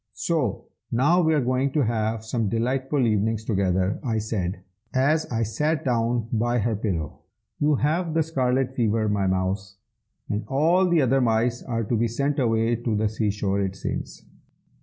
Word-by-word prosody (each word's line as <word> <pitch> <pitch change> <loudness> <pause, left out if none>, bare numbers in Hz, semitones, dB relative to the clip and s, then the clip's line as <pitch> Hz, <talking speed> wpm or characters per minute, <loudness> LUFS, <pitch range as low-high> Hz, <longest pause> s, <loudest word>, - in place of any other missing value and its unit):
"So, 155 - -1 0.3
now 150 +10 +3
we 160 -2 +3
are 150 - +2
going 130 +2 +1
to 150 - +2
have 110 -1 -1
some 110 -2 -1
delightful 130 +4 0
evenings 110 0 0
together," 95 -2 0
I 115 -4 -1
said, 100 -4 -3 0.3
as 145 +4 +2
I 115 -1 0
sat 150 +9 -1
down 120 -2 0
by 120 +2 +1
her 115 0 0
pillow. 90 -8 -3 0.4
"You 150 0 +3
have 160 +4 0
the 165 - +3
scarlet 130 -4 0
fever, 110 -3 +1
my 100 -2 +1
mouse, 95 +1 -1 0.5
and 105 +2 -2
all 170 +7 +3
the 170 -4 +3
other 135 +1 +3
mice 115 0 +1
are 115 -2 -2
to 115 +3 -1
be 115 +1 +1
sent 140 +5 -1
away 115 -1 +2
to 120 -1 -2
the 105 0 +1
sea 110 0 -1
shore, 100 -1 -1
it 95 -1 -2
seems." - - -5
115 Hz, 175 wpm, -24 LUFS, 105-135 Hz, 0.5 s, now